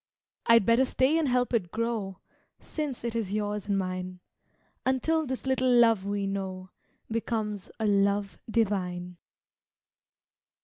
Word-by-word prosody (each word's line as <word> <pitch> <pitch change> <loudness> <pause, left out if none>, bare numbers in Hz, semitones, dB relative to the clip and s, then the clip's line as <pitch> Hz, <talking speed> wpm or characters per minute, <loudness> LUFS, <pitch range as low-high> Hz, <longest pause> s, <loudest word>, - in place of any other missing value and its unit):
I'd 230 -4 +6
better 235 +3 +4
stay 265 +3 +2
and 315 - +1
help 250 -1 +1
it 200 -7 +1
grow, 220 -3 -3 0.4
Since 295 -6 -5
it 235 -1 -3
is 220 -5 -2
yours 210 -1 -2
and 200 -1 +1
mine, 185 -1 -3 0.6
Until 305 +4 +1
this 260 0 -4
little 260 -1 +2
love 230 -5 +5
we 200 0 -1
know 190 -1 -4 0.4
Becomes 220 -3 -2
a 220 - 0
love 200 -1 +1
divine. 180 -5 -1
210 Hz, 130 wpm, -28 LUFS, 195-245 Hz, 0.6 s, I'd